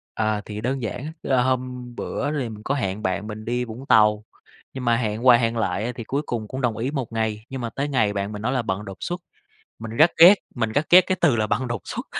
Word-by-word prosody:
À, 110 Hz, -1 st, 0 dB
thì 105 Hz, 0 st, -6 dB
đơn 130 Hz, +3 st, -2 dB
giản 120 Hz, +4 st, -4 dB
á, 155 Hz, -, -5 dB
là 130 Hz, -2 st, +2 dB
hôm 125 Hz, -1 st, -2 dB
bữa 145 Hz, +4 st, -3 dB
thì 125 Hz, -4 st, -3 dB
mình 105 Hz, -1 st, -10 dB
có 140 Hz, -, -1 dB
hẹn 105 Hz, -5 st, -3 dB
bạn 100 Hz, +3 st, -2 dB
mình 110 Hz, 0 st, -7 dB
đi 120 Hz, +1 st, -1 dB
Vũng 120 Hz, +4 st, -9 dB
Tàu. 105 Hz, -3 st, +4 dB, 0.5 s
Nhưng 130 Hz, -1 st, -5 dB
mà 120 Hz, -1 st, +4 dB
hẹn 110 Hz, 0 st, -2 dB
qua 125 Hz, -2 st, +8 dB
hẹn 115 Hz, 0 st, 0 dB
lại 100 Hz, -3 st, -1 dB
á, 120 Hz, -, -2 dB
thì 115 Hz, -, -6 dB
cuối 140 Hz, +6 st, -2 dB
cùng 115 Hz, -5 st, -4 dB
cũng 130 Hz, +5 st, -5 dB
đồng 120 Hz, -4 st, 0 dB
ý 125 Hz, +5 st, -2 dB
một 135 Hz, -7 st, -4 dB
ngày, 110 Hz, -1 st, -2 dB
nhưng 135 Hz, -1 st, -5 dB
mà 120 Hz, -, -3 dB
tới 140 Hz, +5 st, -3 dB
ngày 115 Hz, -7 st, +1 dB
bạn 100 Hz, +1 st, -3 dB
mình 105 Hz, -, -6 dB
nói 120 Hz, +4 st, -1 dB
là 130 Hz, -2 st, +1 dB
bận 105 Hz, -1 st, -3 dB
đột 95 Hz, -2 st, -8 dB
xuất. 175 Hz, +1 st, -4 dB, 0.6 s
Mình 110 Hz, 0 st, -7 dB
rất 160 Hz, +3 st, +6 dB
ghét, 175 Hz, +5 st, +10 dB, 0.2 s
mình 115 Hz, -3 st, -1 dB
rất 145 Hz, +6 st, 0 dB
ghét 180 Hz, +1 st, +9 dB
cái 185 Hz, -, 0 dB
từ 145 Hz, -8 st, +4 dB
là 110 Hz, -2 st, 0 dB
bận 115 Hz, +5 st, -1 dB
đột 115 Hz, -6 st, -3 dB
xuất. -, -, -5 dB
115 Hz, 270 wpm, -23 LUFS, 110-130 Hz, 0.6 s, ghét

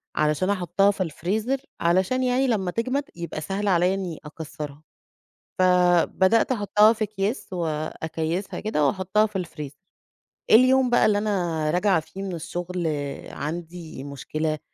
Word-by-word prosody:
علشان 155 Hz, +5 st, +1 dB
أحطها 195 Hz, +1 st, +2 dB
في 190 Hz, -1 st, -2 dB
الFreezer 220 Hz, -, -2 dB, 0.2 s
علشان 185 Hz, +9 st, +2 dB
يعني 255 Hz, +2 st, +2 dB
لما 195 Hz, -7 st, 0 dB
تجَمد 255 Hz, +6 st, -1 dB
يبقى 170 Hz, -2 st, -5 dB
سهل 195 Hz, +5 st, -3 dB
عليّا 180 Hz, 0 st, +3 dB
إني 185 Hz, -5 st, -4 dB
أكسرها. 150 Hz, -1 st, -8 dB, 0.8 s
فبدأت 185 Hz, +5 st, +4 dB
أحطها 210 Hz, 0 st, +4 dB
في 220 Hz, -1 st, -1 dB
أكياس، 205 Hz, +1 st, -3 dB
وأكيّسها 160 Hz, +2 st, -3 dB
كده، 150 Hz, -9 st, +1 dB
وأحطها 195 Hz, +4 st, +2 dB
في 190 Hz, -4 st, -3 dB
الFreezer. 150 Hz, -3 st, -9 dB, 0.7 s
اليوم 255 Hz, +2 st, +6 dB
بقى 240 Hz, -, +4 dB
اللي 210 Hz, -1 st, +3 dB
أنا 175 Hz, -7 st, 0 dB
راجعة 180 Hz, -1 st, +3 dB
فيه 190 Hz, +5 st, -8 dB
من 185 Hz, -3 st, -4 dB
الشغل 175 Hz, +1 st, -4 dB, 0.4 s
عندي 165 Hz, -1 st, -6 dB
مشكلة، 155 Hz, +2 st, -3 dB
185 Hz, 130 wpm, -24 LUFS, 160-210 Hz, 0.8 s, اليوم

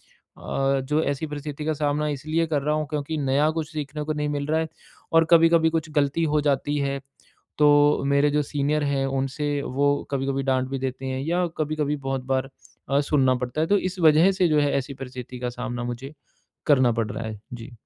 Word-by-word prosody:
अ, 135 Hz, 0 st, -2 dB
जो 150 Hz, +3 st, +1 dB
ऐसी 140 Hz, +2 st, -2 dB
परिस्थिति 150 Hz, 0 st, -6 dB
का 155 Hz, -, +1 dB
सामना 150 Hz, 0 st, 0 dB
इसलिए 155 Hz, +4 st, -1 dB
कर 150 Hz, -3 st, 0 dB
रहा 150 Hz, +1 st, +1 dB
हूँ 155 Hz, -1 st, -2 dB
क्योंकि 150 Hz, +1 st, -3 dB
नया 145 Hz, +2 st, +2 dB
कुछ 160 Hz, -1 st, -4 dB
सीखने 150 Hz, 0 st, -4 dB
को 155 Hz, +1 st, -2 dB
नहीं 150 Hz, 0 st, -2 dB
मिल 145 Hz, -1 st, -2 dB
रहा 160 Hz, +1 st, +1 dB
है, 160 Hz, -, -1 dB, 0.5 s
और 165 Hz, 0 st, +6 dB
कभी-कभी 165 Hz, -1 st, +6 dB
कुछ 160 Hz, -1 st, -2 dB
गलती 145 Hz, +2 st, +1 dB
हो 150 Hz, -, +3 dB
जाती 145 Hz, 0 st, 0 dB
है, 140 Hz, -1 st, -1 dB, 0.6 s
तो 145 Hz, -1 st, +5 dB
मेरे 140 Hz, +1 st, +3 dB
जो 150 Hz, 0 st, +2 dB
सीनियर 145 Hz, +1 st, -1 dB
हैं 140 Hz, -1 st, 0 dB
उनसे 140 Hz, +2 st, -2 dB
वो 140 Hz, +2 st, +1 dB, 0.2 s
कभी-कभी 135 Hz, 0 st, -1 dB
डाँट 130 Hz, -1 st, +1 dB
भी 135 Hz, -1 st, -3 dB
देते 130 Hz, 0 st, -4 dB
हैं 130 Hz, 0 st, -3 dB
या 175 Hz, +3 st, +1 dB
कभी-कभी 150 Hz, -1 st, -1 dB
बहुत 135 Hz, -1 st, -2 dB
बार 135 Hz, +1 st, -1 dB, 0.4 s
अ, 140 Hz, +1 st, +3 dB
सुनना 135 Hz, -3 st, +2 dB
पड़ता 125 Hz, +5 st, -3 dB
है, 160 Hz, -, +1 dB
तो 205 Hz, -, +4 dB
इस 185 Hz, 0 st, -3 dB
वजह 160 Hz, +4 st, +6 dB
से 185 Hz, -2 st, +2 dB
जो 150 Hz, -1 st, +3 dB
है 145 Hz, -1 st, +2 dB
ऐसी 140 Hz, +1 st, -3 dB
परिस्थिति 125 Hz, -1 st, -8 dB
का 125 Hz, 0 st, -2 dB
सामना 120 Hz, 0 st, -3 dB
मुझे 120 Hz, +4 st, -6 dB, 0.5 s
करना 130 Hz, -5 st, +5 dB
पड़ 110 Hz, -, -3 dB
रहा 115 Hz, -, -5 dB
है। 110 Hz, -2 st, -7 dB
जी। 120 Hz, +1 st, -8 dB
145 Hz, 210 wpm, -24 LUFS, 135-155 Hz, 0.6 s, और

